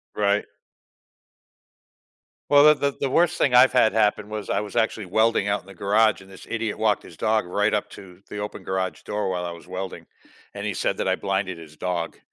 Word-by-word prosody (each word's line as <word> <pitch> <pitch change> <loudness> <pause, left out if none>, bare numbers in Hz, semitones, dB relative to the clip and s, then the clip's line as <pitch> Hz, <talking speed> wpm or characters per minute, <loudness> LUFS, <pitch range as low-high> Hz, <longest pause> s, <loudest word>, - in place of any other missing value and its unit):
Right. 105 0 +1 2.0
Well, 145 0 +7
that 150 -1 +6
that 140 -1 -1
the 140 - -1
worst 175 +5 +2
thing 125 - +2
I've 125 +1 +7
had 120 -4 +4
happen 105 -1 +1
was 105 -1 -6
I - - +1
was 105 -2 -8
actually 110 -2 0
welding 110 +2 +2
out 100 0 0
in 95 - -24
the 95 - -11
garage 105 +4 +2
and 95 - -16
this 95 - -13
idiot 115 -2 -2
walked 110 -2 +1
his 85 - -13
dog 110 -2 +1
right 105 +4 0
up 105 - -1
to 90 -1 -13
the 105 - -6
open 105 0 -6
garage 95 0 -3
door 105 -2 -2
while 90 -1 -2
I 85 - -4
was 85 +1 -12
welding, 95 +1 -6 0.5
and - - -6
he - - -1
said - - -1
that - - -2
I - - +2
blinded 95 -2 -2
his 80 -2 -13
dog. 85 0 -3
105 Hz, 215 wpm, -24 LUFS, 95-110 Hz, 2.0 s, Well